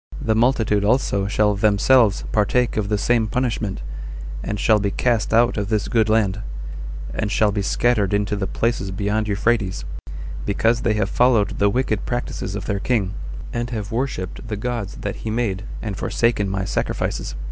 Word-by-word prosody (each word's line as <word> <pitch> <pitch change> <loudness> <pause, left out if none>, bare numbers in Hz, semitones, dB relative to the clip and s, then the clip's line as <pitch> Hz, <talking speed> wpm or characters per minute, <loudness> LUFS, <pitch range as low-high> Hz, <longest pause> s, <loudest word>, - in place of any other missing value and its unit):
The 110 - +1
multitude 110 -3 +2
also 105 -3 +2
shall 105 0 +2
themselves 105 +2 +4
partake 115 +3 +2
of 105 -2 -1
the 105 - +2
same 115 +1 +2
punishment, 110 - -2 0.6
and 105 0 -3
shall 110 0 +4
be 100 0 0
cast 115 +1 0
out 120 +2 +4
of 100 -1 -2
this 110 -2 0
good 110 -3 +2
land, 110 -2 +2 0.7
and 105 - -2
shall 105 -1 +3
be 100 0 -1
scattered 105 -1 +2
into 105 0 +1
the 100 -1 -2
places 100 +7 -1
beyond 105 +3 -1
Euphrates, 100 -3 0 0.6
because 115 +3 +1
they 110 - +1
have 105 - +1
followed 120 -4 +3
the 100 - +4
wicked 110 -2 0
practices 120 -5 -3
of 100 - -4
their 100 -2 -1
king, 100 -4 0 0.4
and 120 0 -2
have 105 -4 -4
worshipped 115 -4 -3
the 105 -2 -3
gods 115 -3 -3
that 100 - -3
he 110 - -5
made, 110 -3 -1 0.2
and 105 -3 -3
forsaken 115 -4 +1
my 95 0 -1
sacrifices. 95 - -2
105 Hz, 170 wpm, -22 LUFS, 100-115 Hz, 0.7 s, themselves